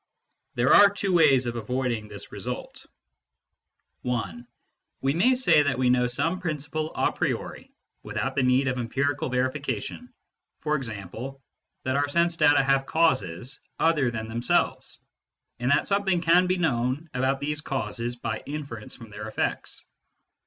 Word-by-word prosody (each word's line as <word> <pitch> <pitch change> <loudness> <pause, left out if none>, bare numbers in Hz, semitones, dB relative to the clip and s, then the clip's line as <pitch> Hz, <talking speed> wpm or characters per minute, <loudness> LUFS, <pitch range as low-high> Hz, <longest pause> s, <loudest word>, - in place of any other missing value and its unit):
There - - +4
are 205 -1 +9
two 200 -1 -2
ways 140 -7 +5
of 120 0 -3
avoiding 120 -1 -2
this - - -8
result. - - -6 1.1
(1) 120 0 -3 0.5
We 135 +1 +1
may 235 - +4
say 250 -11 +5
that 145 -3 0
we 125 -1 +3
know 125 -1 +3
some 145 +9 -1
principle 155 -2 -3
a - - +2
priori, - - -3 0.3
without - - -3
the - - +1
need 130 +1 +3
of 130 -1 -1
empirical 135 +4 -1
verification, 130 - -2 0.5
e.g. 130 -10 -2 0.8
that 130 +1 0
our 145 0 +1
sense 170 +2 +2
data 145 -4 +5
have 135 0 +2
causes 130 - 0 0.2
other 155 -6 +3
than 110 -2 -4
themselves, 115 +2 0 0.6
and 125 +1 0
that 145 +2 +3
something 195 -3 +2
can 170 +2 +4
be 185 +1 +1
known 135 -1 0
about 130 +2 0
these 150 +1 -2
causes 120 -3 -3
by 120 - -4
inference 140 -7 -6
from 115 -2 -13
their 105 +1 -7
effects. 110 - -3
135 Hz, 145 wpm, -26 LUFS, 120-155 Hz, 1.1 s, are